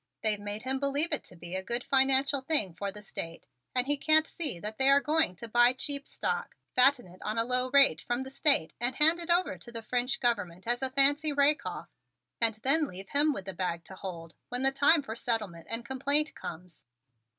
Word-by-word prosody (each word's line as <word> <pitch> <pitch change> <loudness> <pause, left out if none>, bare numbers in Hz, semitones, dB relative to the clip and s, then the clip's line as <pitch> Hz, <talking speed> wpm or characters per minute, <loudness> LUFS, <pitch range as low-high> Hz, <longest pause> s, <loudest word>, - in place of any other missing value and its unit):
They've 215 -2 +1
made 205 +1 -5
him 265 +1 -1
believe 280 +4 +1
it 300 - -2
to 180 - -12
be 175 +1 -10
a 190 - -2
good 235 +5 -2
financial 270 +1 +2
thing 260 - +1
for 200 +3 -4
the 210 +1 -12
State 165 -4 -7 0.3
and 250 -1 +1
he 290 +1 +3
can't 310 +2 +3
see 295 - -1
that 210 +3 -7
they 265 0 +5
are 280 0 +6
going 300 - +1
to 230 +6 -8
buy 240 +2 +4
cheap 280 +1 -2
stock, 470 +1 -3 0.2
fatten 255 -1 +4
it 180 +1 -17
on 215 +1 -4
a 230 - +1
low 250 +1 +1
rate 270 - +4
from 240 +2 -3
the 265 - -10
State 275 - +2
and 245 +2 -2
hand 320 +4 +4
it 340 0 -5
over 345 - +1
to 235 - -11
the 230 -1 -7
French 245 +2 -1
Government 200 -7 -1
at 240 +2 -1
a 265 - -1
fancy 285 +3 +3
rake 285 -5 +2
off 180 - -7 0.5
and 225 -2 +2
then 295 +3 +3
leave 190 -1 -10
him 295 +2 +3
with 195 -9 -6
the 190 - -6
bag 170 -2 -3
to 190 - -10
hold 170 -4 -8 0.2
when 245 +1 -1
the 270 - +4
time 285 +3 +3
for 220 -4 -6
settlement 215 -9 -3
and 230 +1 -5
complaint 280 +4 +1
comes. 170 -4 -9
250 Hz, 225 wpm, -29 LUFS, 205-280 Hz, 0.5 s, are